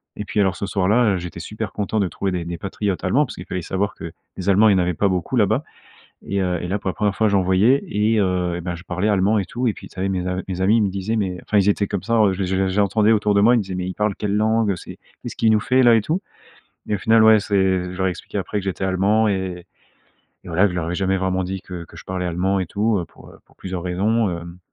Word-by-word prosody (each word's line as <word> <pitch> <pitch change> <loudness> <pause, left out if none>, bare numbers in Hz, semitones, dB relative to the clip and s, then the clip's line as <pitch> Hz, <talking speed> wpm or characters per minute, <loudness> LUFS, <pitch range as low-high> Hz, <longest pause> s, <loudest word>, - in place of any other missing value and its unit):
et 105 - -5
puis 105 - -2
alors, 95 -2 +2
ce 100 - -4
soir-là, 100 +2 +2
heu, - - -1
j'étais 85 -1 -7
super 105 +6 -5
content 105 +1 -2
de 100 - +1
trouver 95 +2 -3
des 90 -2 -3
des 85 0 -5
patriotes 100 0 -3
Allemands- 130 +11 +2
parce - - -8
qu'il 90 - -9
fallait 90 -1 -4
savoir 100 +3 -2
que - - -8 0.3
les 95 - -5
Allemands, 105 +3 +5
il - - +5
y - - +3
en - - +2
avait 90 0 +1
pas 100 - +1
beaucoup 95 +6 -1
là-bas- 110 +6 +2 0.6
et 100 0 -1
heu, 90 -2 0
et 90 - -4
là 100 +2 -1
pour 100 - -4
la 95 - -2
1re 105 -2 0
fois, 110 -1 +3
j'en 100 -1 +2
voyais 95 +9 +3
et 110 -1 +1
heu, 90 -2 0
et - - -4
ben, 90 -1 -3
je 85 - -11
parlais 90 +4 -1
allemand 105 +1 +2
et 100 - 0
tout 125 +6 -3
et 105 - -1
puis, - - -11
ça 95 - -6
y - - 0
est, - - 0
mes 90 -2 -2
a 90 0 -2
mes 95 -1 -4
amis 105 +4 +4
ils - - +2
me - - +1
disaient: 100 +4 -2
«Mais, 100 -4 0
heu», - - -9
enfin, 105 - +1
ils 100 0 +3
étaient 100 0 +2
comme 100 -4 -3
ça, 115 - 0
en 105 -3 +4
je 95 - -5
les 95 - 0
je 95 +1 -1
les 95 0 +1
je 95 - -4
les - - +1
entendais 105 +2 +3
autour 105 -1 +2
de 100 - +4
moi, 120 +4 +6
ils - - +4
me 110 - 0
disaient: 95 -1 -6
«Mais 90 0 -3
il - - -3
parle 105 -1 0
quelle 105 -1 -2
langue? 110 0 +2
Heu, 95 - -1
c'est - - -10 0.2
qu'est-ce - - -7
qu'il 110 -1 +3
nous 110 - +3
fait 130 +4 +2
là?» 120 -2 +6
et - - +3
tout 160 - -2 0.7
et 105 - 0
au - - -2
final, 110 +4 +4
ouais, 110 0 +7
c'est 105 0 -6 0.4
je - - -9
leur 95 0 +1
ai - - +2
expliqué 90 - -7
après - - -4
que - - -7
j'étais 95 0 -3
Allemand 100 +4 +2
et 95 -3 -3 0.8
et - - -8
voilà. 85 +3 +1
Que - - -1
je 90 - -6
leur 85 - -1
avais 85 - -3
jamais 95 +1 0
vraiment 95 0 -1
dit 95 +1 -4
que 90 -2 -8
que - - -16
je - - -11
parlais 90 -1 -3
allemand 95 +3 0
et 95 - -2
tout, 105 +4 0
heu, - - -4
pour - - -16
heu, - - -16
pour - - -27
plusieurs 90 -2 -5
raisons, 100 +4 +1
hem 85 +1 -7
95 Hz, 320 wpm, -21 LUFS, 90-105 Hz, 0.8 s, ouais